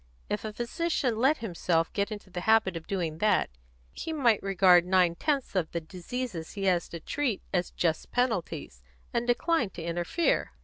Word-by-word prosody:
If 210 Hz, -, -1 dB
a 215 Hz, -, -4 dB
physician 250 Hz, +2 st, -1 dB
let 270 Hz, +6 st, +3 dB
himself 170 Hz, -3 st, 0 dB
get 200 Hz, +1 st, -1 dB
into 205 Hz, -3 st, -8 dB
the 175 Hz, -, -4 dB
habit 220 Hz, -2 st, +3 dB
of 165 Hz, -1 st, -7 dB
doing 170 Hz, -5 st, -2 dB
that, 210 Hz, -, +2 dB, 0.4 s
he 325 Hz, -, -5 dB
might 245 Hz, -9 st, +3 dB
regard 185 Hz, -2 st, +5 dB
nine 180 Hz, -1 st, +3 dB
tenths 280 Hz, -, -1 dB
of 170 Hz, -4 st, 0 dB
the 170 Hz, -, 0 dB
diseases 180 Hz, +2 st, -6 dB
he 200 Hz, -, -5 dB
has 180 Hz, -3 st, +2 dB
to 170 Hz, -, -6 dB
treat 260 Hz, -, -2 dB
as 180 Hz, -1 st, +1 dB
just 160 Hz, -2 st, -1 dB
penalties, 175 Hz, -, -1 dB, 0.3 s
and 235 Hz, 0 st, 0 dB
decline 250 Hz, -, +2 dB
to 170 Hz, -, -8 dB
interfere." 175 Hz, -, 0 dB
195 Hz, 175 wpm, -28 LUFS, 170-240 Hz, 0.4 s, regard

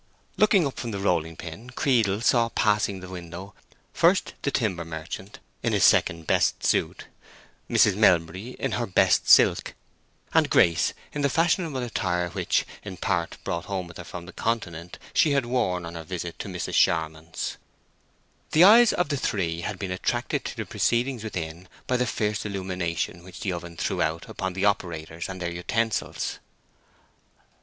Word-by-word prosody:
Looking 205 Hz, -5 st, +4 dB
up 135 Hz, -, -4 dB
from 120 Hz, -, -4 dB
the 105 Hz, -, -3 dB
rolling 85 Hz, -4 st, 0 dB
pin, 90 Hz, +10 st, -9 dB
Creedle 115 Hz, -6 st, +1 dB
saw 120 Hz, -1 st, +3 dB
passing 105 Hz, -3 st, +1 dB
the 90 Hz, -, -8 dB
window 90 Hz, +2 st, -8 dB, 0.4 s
first 180 Hz, +3 st, +3 dB
the -, -, 0 dB
timber 105 Hz, -11 st, -1 dB
merchant, 80 Hz, +4 st, -7 dB, 0.2 s
in -, -, 0 dB
his -, -, +2 dB
second 85 Hz, -1 st, +4 dB
best -, -, +1 dB
suit, -, -, 0 dB, 0.6 s
Mrs. -, -, +4 dB
Melbury 90 Hz, +7 st, +2 dB
in -, -, -1 dB
her 120 Hz, -1 st, -1 dB
best 95 Hz, -, +3 dB
silk, -, -, +5 dB, 0.6 s
and -, -, +4 dB
Grace 85 Hz, 0 st, +4 dB, 0.2 s
in 150 Hz, -, -2 dB
the 140 Hz, -, +2 dB
fashionable 165 Hz, -4 st, +1 dB
attire 90 Hz, -7 st, -1 dB
which, 85 Hz, -, 0 dB, 0.2 s
in -, -, -7 dB
part -, -, -1 dB
brought 85 Hz, 0 st, -3 dB
home 95 Hz, -2 st, -3 dB
with 85 Hz, -1 st, -12 dB
her -, -, -7 dB
from 90 Hz, -1 st, -8 dB
the 95 Hz, -, -11 dB
Continent, 90 Hz, -7 st, -3 dB, 0.2 s
she 150 Hz, -3 st, +4 dB
had 140 Hz, -3 st, +1 dB
worn 105 Hz, -8 st, 0 dB
on 85 Hz, -, -7 dB
her 85 Hz, -1 st, -6 dB
visit 85 Hz, 0 st, -6 dB
to -, -, -5 dB
Mrs. 90 Hz, -3 st, -4 dB
Charmond's. 80 Hz, 0 st, 0 dB, 1.0 s
The 160 Hz, -, +7 dB
eyes 225 Hz, +4 st, +8 dB
of 175 Hz, -4 st, 0 dB
the 145 Hz, -, 0 dB
three 85 Hz, -9 st, -1 dB
had 100 Hz, +3 st, -4 dB
been 95 Hz, 0 st, -4 dB
attracted 90 Hz, -, -1 dB
to -, -, -4 dB
the -, -, -3 dB
proceedings 120 Hz, 0 st, 0 dB
within 90 Hz, -4 st, -6 dB, 0.2 s
by 125 Hz, -, +1 dB
the 125 Hz, 0 st, 0 dB
fierce 105 Hz, -2 st, -1 dB
illumination 90 Hz, -4 st, -3 dB
which 95 Hz, 0 st, -11 dB
the 95 Hz, -, -1 dB
oven 85 Hz, -1 st, -7 dB
threw -, -, -1 dB
out 80 Hz, +1 st, -1 dB
upon 95 Hz, -1 st, -4 dB
the 95 Hz, +2 st, -1 dB
operators 85 Hz, -4 st, -2 dB
and 95 Hz, -1 st, -6 dB
their 85 Hz, -1 st, -3 dB
utensils. 110 Hz, +6 st, -2 dB
95 Hz, 170 wpm, -26 LUFS, 85-115 Hz, 1.0 s, eyes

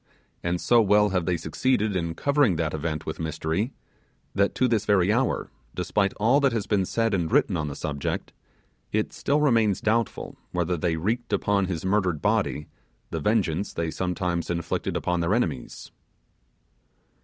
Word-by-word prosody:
And 85 Hz, 0 st, -1 dB
so 120 Hz, +5 st, +4 dB
well 105 Hz, 0 st, +4 dB
have 90 Hz, -3 st, -1 dB
they 90 Hz, -1 st, +1 dB
succeeded 105 Hz, +5 st, 0 dB
in 85 Hz, -2 st, -2 dB
covering 140 Hz, -, +2 dB
the 80 Hz, +1 st, 0 dB
event 80 Hz, 0 st, -3 dB
with 80 Hz, -, -5 dB
mystery, 80 Hz, -, -2 dB, 0.6 s
that 100 Hz, 0 st, +1 dB
to 130 Hz, -, +3 dB
this 115 Hz, -4 st, +1 dB
very 100 Hz, -2 st, +3 dB
hour, 125 Hz, +2 st, 0 dB, 0.2 s
despite 95 Hz, +2 st, +1 dB
all 120 Hz, +7 st, +3 dB
that 140 Hz, -4 st, +2 dB
has 110 Hz, -3 st, -1 dB
been 100 Hz, -3 st, +1 dB
said 115 Hz, +2 st, 0 dB
and 85 Hz, -4 st, 0 dB
written -, -, +3 dB
on 75 Hz, -2 st, -1 dB
the 70 Hz, -, -5 dB
subject, 70 Hz, -1 st, -3 dB, 0.6 s
it 110 Hz, 0 st, -1 dB
still 145 Hz, +2 st, +1 dB
remains 115 Hz, -9 st, +3 dB
doubtful 115 Hz, 0 st, -1 dB, 0.2 s
whether 90 Hz, 0 st, 0 dB
they 85 Hz, 0 st, 0 dB
wreaked 110 Hz, +10 st, -2 dB
upon 100 Hz, -1 st, +2 dB
his 90 Hz, -2 st, -4 dB
murdered 95 Hz, -5 st, +1 dB
body 75 Hz, -, 0 dB, 0.5 s
the 80 Hz, -, -2 dB
vengeance 100 Hz, 0 st, 0 dB
they 85 Hz, -1 st, -2 dB
sometimes 90 Hz, -1 st, -2 dB
inflicted 85 Hz, -1 st, -2 dB
upon 90 Hz, -1 st, -1 dB
their 85 Hz, +5 st, +1 dB
enemies. 80 Hz, -, -3 dB
95 Hz, 165 wpm, -26 LUFS, 85-110 Hz, 0.6 s, so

